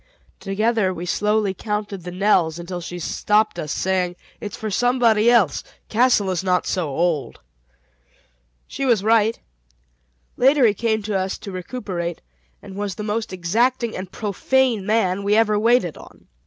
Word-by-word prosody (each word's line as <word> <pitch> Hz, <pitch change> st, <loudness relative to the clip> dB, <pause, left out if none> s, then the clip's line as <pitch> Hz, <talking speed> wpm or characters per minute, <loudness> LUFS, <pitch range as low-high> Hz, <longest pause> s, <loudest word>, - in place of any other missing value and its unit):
Together 210 Hz, 0 st, 0 dB
we 175 Hz, -1 st, -6 dB
slowly 210 Hz, +2 st, +1 dB
counted 210 Hz, -1 st, -4 dB
the 180 Hz, -, -6 dB
knells 180 Hz, -4 st, +2 dB
until 175 Hz, +1 st, -6 dB
she 175 Hz, +1 st, -7 dB
stopped 210 Hz, +5 st, 0 dB
us, 150 Hz, -, -4 dB
saying, 185 Hz, 0 st, 0 dB, 0.2 s
"It's 205 Hz, -1 st, -6 dB
for 215 Hz, -1 st, -4 dB
somebody 235 Hz, -1 st, +3 dB
else; 215 Hz, -, +3 dB, 0.3 s
Castle 220 Hz, -4 st, +3 dB
is 185 Hz, 0 st, -2 dB
not 180 Hz, -1 st, +1 dB
so 175 Hz, -5 st, -1 dB
old." 155 Hz, -2 st, -1 dB, 1.3 s
She -, -, -6 dB
was 235 Hz, -7 st, +2 dB
right. 225 Hz, 0 st, +3 dB, 1.0 s
Later 270 Hz, +1 st, +5 dB
he 215 Hz, -, +4 dB
came 220 Hz, 0 st, -1 dB
to 210 Hz, 0 st, -3 dB
us 190 Hz, 0 st, -1 dB
to 200 Hz, -, -8 dB
recuperate, 180 Hz, -3 st, -5 dB, 0.4 s
and 190 Hz, -, -10 dB
was 200 Hz, -2 st, -3 dB
the 210 Hz, -, -6 dB
most 220 Hz, +2 st, -2 dB
exacting 230 Hz, +7 st, 0 dB
and 185 Hz, 0 st, -6 dB
profane 220 Hz, +1 st, 0 dB
man 200 Hz, -3 st, +1 dB
we 200 Hz, +1 st, +2 dB
ever 215 Hz, -2 st, +3 dB
waited 225 Hz, -7 st, +2 dB
on. -, -, -16 dB
205 Hz, 155 wpm, -21 LUFS, 185-225 Hz, 1.3 s, Later